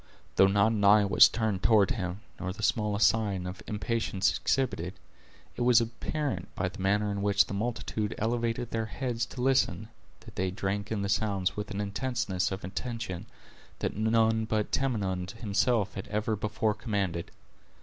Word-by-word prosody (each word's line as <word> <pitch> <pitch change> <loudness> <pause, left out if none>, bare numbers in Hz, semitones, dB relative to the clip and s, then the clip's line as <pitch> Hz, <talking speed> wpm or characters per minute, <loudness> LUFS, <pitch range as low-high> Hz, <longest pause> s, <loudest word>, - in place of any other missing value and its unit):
Though 95 - +6
not 100 +3 +3
an 105 -2 -1
eye 105 +1 +6
was 100 - +7
turned 110 -5 -1
toward 100 -1 +4
him 90 0 -3 0.2
nor 95 - -3
the 105 +3 -8
smallest 105 -2 +3
sign 100 -5 0
of 90 +2 -6
impatience 105 -2 0
exhibited, 100 -9 -1 0.6
it - - -5
was 120 -1 +6
apparent, 115 - -3
by 90 -1 -1
the 90 - -12
manner 105 +2 +1
in 100 0 -3
which 100 0 +4
the - - -7
multitude 110 -1 -2
elevated 115 +1 -1
their 110 -1 -1
heads 120 0 -2
to 125 - -7
listen, 130 -4 +1 0.3
that - - -14
they 95 0 0
drank 100 +2 -3
in 105 -2 -1
the - - -1
sounds 100 -2 0
with 105 0 -4
an 100 -1 -4
intenseness 100 -3 -1
of 95 - -5
attention, 100 0 -5 0.5
that - - -3
none 110 +1 +2
but 110 -1 -1
Tamenund 100 -9 -1
himself 110 0 0
had 95 - -6
ever 110 +1 -1
before 105 +1 0
commanded. 100 -7 -2
105 Hz, 170 wpm, -29 LUFS, 95-115 Hz, 0.6 s, was